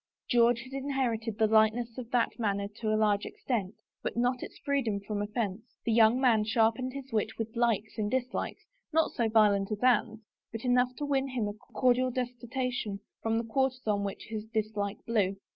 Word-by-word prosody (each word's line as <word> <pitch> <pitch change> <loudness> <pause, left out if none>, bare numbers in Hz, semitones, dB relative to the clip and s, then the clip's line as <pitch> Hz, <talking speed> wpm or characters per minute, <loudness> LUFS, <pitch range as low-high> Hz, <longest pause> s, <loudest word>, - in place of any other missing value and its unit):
George 235 -1 +4
had 260 +2 -11
inherited 255 -6 -1
the 220 - +4
lightness 220 +2 +3
of 235 -2 -7
that 245 0 +1
manner 200 -2 0
tp 215 +3 -11
a 215 - +2
large 210 -2 +2
extent, 215 -6 -3 0.3
but - - -4
not 245 +1 +1
its - - -8
freedom 260 -8 0
from 205 +1 -4
offense; 210 -1 -2 0.2
the 230 - +1
young 225 +2 +5
man 235 -5 +4
sharpened 225 +3 +1
his 275 -1 -8
wit 215 0 -1
with 225 0 -4
likes 225 -2 0
and 210 -1 0
dislikes, 255 +1 -2 0.3
not 320 0 +2
so 230 -2 0
violent 210 -2 +4
as 210 +2 -3
Anne's, 230 -3 +3 0.3
but 225 +2 -6
enough 250 0 +3
to 290 - -3
win 275 -1 +1
him 250 -5 -2
a 205 - -3
cordial 250 +2 +1
detestation 245 -3 -3 0.2
from 225 0 0
the 230 - 0
quarters 260 +2 -1
on 205 -2 +1
which 200 -1 -4
his 215 -1 -4
dislike 215 -2 -2
blew. 205 -4 +1
230 Hz, 190 wpm, -30 LUFS, 215-250 Hz, 0.3 s, young